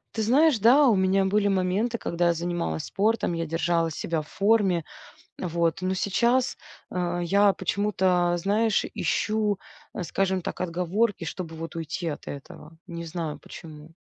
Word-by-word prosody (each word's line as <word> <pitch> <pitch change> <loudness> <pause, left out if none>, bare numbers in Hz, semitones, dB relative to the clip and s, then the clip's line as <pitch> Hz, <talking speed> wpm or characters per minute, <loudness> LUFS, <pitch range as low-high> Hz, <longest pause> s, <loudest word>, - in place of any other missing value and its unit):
Ты 220 - 0
знаешь, 275 +4 +4
да, 255 +7 +6
у 230 - +5
меня 190 0 +2
были 205 +1 +2
моменты, 195 +5 0
когда 175 +1 0
я 170 - +3
занималась 170 - -3
спортом, 215 -2 0
я 165 0 -2
держала 165 +1 0
себя 160 +1 -2
в - - -18
форме. 195 -3 +2 0.6
Вот, 170 -1 -1
но 185 +1 0
сейчас, 235 +7 +1 0.4
э-э, 175 -1 -1
я 200 +3 +4
почему-то, 185 -3 +1
знаешь, 210 +4 +1
ищу, 210 -2 0 0.4
э, 190 - -3
скажем 190 +2 0
так, - - -6
отговорки, 180 +3 0
чтобы 165 -1 -6
вот 165 +1 -7
уйти 165 +1 -4
от 150 -3 -5
этого. 150 +3 -10
Не 170 0 -6
знаю 165 -2 -4
почему. 155 -1 -11
185 Hz, 155 wpm, -26 LUFS, 170-205 Hz, 0.6 s, да